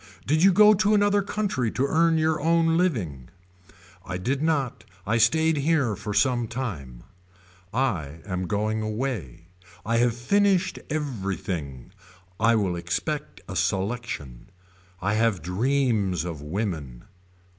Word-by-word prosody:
Did 155 +3 +2
you 195 +2 +7
go 210 +3 +7
to 210 +1 +3
another 205 0 +3
country 195 - -1
to 130 - +1
earn 165 +3 +3
your 155 -1 +1
own 165 +1 +3
living. 100 - -1 0.7
I 90 - -4
did 130 +9 -1
not 140 -8 0 0.2
I 115 +3 +1
stayed 160 +8 +3
here 140 -6 +1
for 105 - -6
some 120 +3 +2
time. 80 - -6 0.7
I 85 - -2
am 90 -2 -3
going 110 +2 -1
away. 105 - -4 0.4
I 115 +1 +1
have 120 0 +2
finished 190 +7 +2
everything. 95 - -4 0.5
I 115 +1 +4
will 95 -5 0
expect 85 0 -3
a - - -6
selection. 95 - -3 0.5
I 100 +1 +1
have 110 -6 +1
dreams 105 - 0
of 80 -4 -5
women. 75 - -4
115 Hz, 130 wpm, -25 LUFS, -, 0.7 s, you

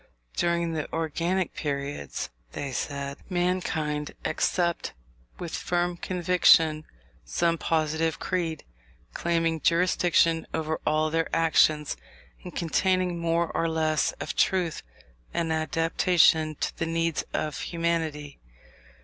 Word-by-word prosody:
During 170 -1 +1
the 155 -2 -3
organic 170 +3 -1
periods 140 - -4 0.2
(they 140 -1 -4
said) 140 +2 -3
mankind 175 -5 -1
accept 170 +2 0 0.4
with 170 -2 -6
firm 175 0 0
conviction 170 -3 +3 0.4
some 165 - 0
positive 160 0 0
creed, 165 -4 -2 0.5
claiming 165 -2 0
jurisdiction 170 -1 +3
over 160 0 -2
all 155 0 +2
their 165 0 0
actions, 155 -2 +3 0.5
and 180 - -9
containing 180 +1 +1
more 170 0 +1
or 165 - +1
less 155 -1 +1
of - - -5
truth 180 -4 +1 0.5
and 165 -1 0
adaptation 160 0 +3
to - - -3
the 165 - -2
needs 165 0 0
of 150 - -2
humanity. 160 -4 -2
165 Hz, 105 wpm, -27 LUFS, 155-170 Hz, 0.5 s, conviction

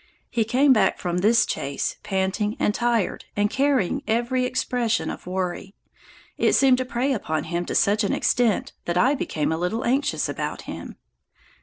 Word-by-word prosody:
He 230 -3 +1
came 260 +5 +4
back 210 -5 +2
from 175 0 -2
this 230 +5 +4
chase 140 0 -3
panting 205 +2 -1
and 210 - +2
tired 235 -3 0
and 205 0 +1
carrying 270 -8 +1
every 240 +3 +1
expression 245 -2 -1
of - - -10
worry. 185 +1 -4 0.6
It - - +3
seemed 260 -2 +5
to 255 - -1
prey 255 +3 0
upon 155 - -2
him 170 +1 -3
to - - -4
such 210 +2 +3
an 200 - 0
extent 235 -5 +1
that 175 0 -1
I 255 +10 +4
became 160 - -2
a 160 - -1
little 180 +7 -2
anxious 270 +4 +1
about - - -4
him. - - -8
220 Hz, 170 wpm, -24 LUFS, 190-250 Hz, 0.6 s, seemed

